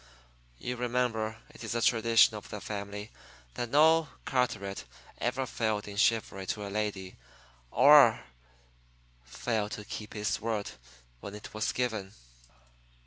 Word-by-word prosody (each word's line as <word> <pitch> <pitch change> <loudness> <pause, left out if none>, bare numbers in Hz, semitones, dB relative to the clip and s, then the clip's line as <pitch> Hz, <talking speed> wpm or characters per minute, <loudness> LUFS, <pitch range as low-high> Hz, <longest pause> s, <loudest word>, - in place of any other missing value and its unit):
You 125 - -4
remember, 120 -3 -1
it - - -12
is 115 +1 -3
a 115 - 0
tradition 115 -1 +5
of 105 - -9
the 105 - -6
family, 105 +1 -6 0.4
that 120 - -4
no 160 +3 +5 0.2
Carteret 110 -7 -1 0.4
ever 125 +2 -1
failed 110 -4 -2
in 100 - -7
chivalry 105 -3 +1
to 105 -1 -3
a 100 - -6
lady 100 -3 -3 0.5
or 140 - +7 1.0
failed 105 - -2
to 105 - -7
keep 105 0 -7
his 105 -3 -1
word 110 -2 -2 0.5
when 100 +10 -8
it 105 - -10
was 110 0 -1
given." 110 -6 -2
110 Hz, 135 wpm, -30 LUFS, 105-120 Hz, 1.0 s, or